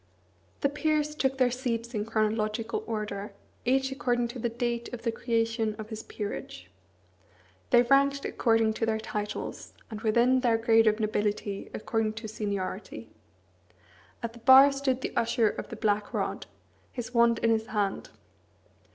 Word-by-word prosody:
The 280 - +3
peers 300 +1 0
took 265 -3 0
their 255 -2 +3
seats 235 -2 -3
in 210 -2 -2
chronological 220 +1 -1
order, 210 -2 -4 0.3
each 265 +2 +2
according 240 -3 0
to 245 +1 -7
the 235 - -1
date 235 0 -3
of 245 -2 -7
the 230 - +1
creation 225 -1 -1
of 215 -1 -8
his 220 -1 -5
peerage. 200 - -7 1.0
They 240 - +6
ranked 275 +2 +3
according 225 -1 +2
to 225 +1 -2
their 220 0 +1
titles, 210 -1 -5 0.2
and 215 -1 -6
within 240 +4 +3
their 240 -3 +2
grade 225 0 +4
of 215 +1 +3
nobility 210 -2 -2
according 220 0 -1
to 220 0 -7
seniority. 200 - -5 1.1
At 230 -1 -3
the 235 - -13
bar 265 +4 +8
stood 270 -2 -1
the - - -4
Usher 230 -1 +2
of - - -7
the - - -6
Black 205 -1 -1
Rod, - - -2 0.4
his 245 0 -6
wand 235 -1 +4
in 230 - +4
his 220 0 0
hand. 205 -3 -2
230 Hz, 155 wpm, -28 LUFS, 215-245 Hz, 1.1 s, bar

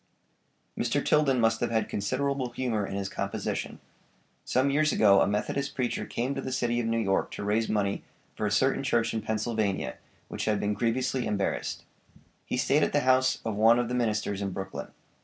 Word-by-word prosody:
Mr. - - 0
Tilden 140 -4 +3
must 115 -1 +2
have 120 - 0
had 110 -1 0
considerable 135 +5 -1
humor 120 -4 -2
in - - -5
his 100 -1 -2
composition. 100 0 -3 0.7
Some 130 +2 +1
years 155 +1 +3
ago 100 -2 +5
a - - +3
Methodist 105 +7 -2
preacher 125 -3 -2
came 125 +4 -2
to 135 - -4
the 130 - -5
city 120 -2 0
of 115 - -1
New 115 0 +1
York 95 -4 +1
to - - -5
raise 105 +3 +1
money 100 -2 0 0.3
for 105 - -1
a - - -2
certain 130 +6 +2
church 115 -4 +1
in 110 - -1
Pennsylvania 110 -2 -1 0.3
which - - -4
had 105 -2 +1
been 105 0 0
grievously 125 +3 0
embarrassed. 100 -2 -2 0.6
He - - -1
stayed - - +3
at - - +1
the - - +3
house 130 0 +3
of 110 -2 -1
one 110 +3 +5
of 120 -1 0
the - - -3
ministers 105 -4 0
in 100 - -1
Brooklyn. 95 0 -5
115 Hz, 195 wpm, -28 LUFS, 105-130 Hz, 0.7 s, ago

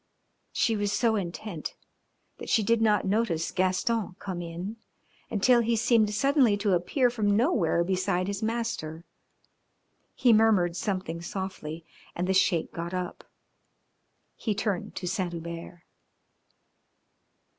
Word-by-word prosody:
She 225 - +1
was 205 -1 0
so 225 +1 +2
intent 180 -2 -4 0.6
that - - -7
she 220 - +3
did 230 +2 +2
not 210 -3 +3
notice 195 -5 0
Gaston 185 +2 0
come 185 -3 -5
in 175 +6 -6 0.5
until 235 +4 +4
he 230 0 +1
seemed 220 -1 +3
suddenly 255 -1 +3
to 205 -1 +1
appear 240 - +2
from 205 -4 +1
nowhere 215 - +2
beside 185 0 0
his 200 0 -3
master. 220 -8 -3 1.1
He 245 -3 +4
murmured 210 -6 +4
something 185 -3 -3
softly 170 -3 -5 0.3
and 175 - -1
the 190 - +2
Sheik 185 -3 +2
got 170 +2 -4
up. 180 -1 -4 1.1
He 215 -3 -2
turned 200 -4 -2
to 180 - -4
Saint 180 -1 -2
Hubert. 170 +1 -7
195 Hz, 125 wpm, -28 LUFS, 175-220 Hz, 1.1 s, until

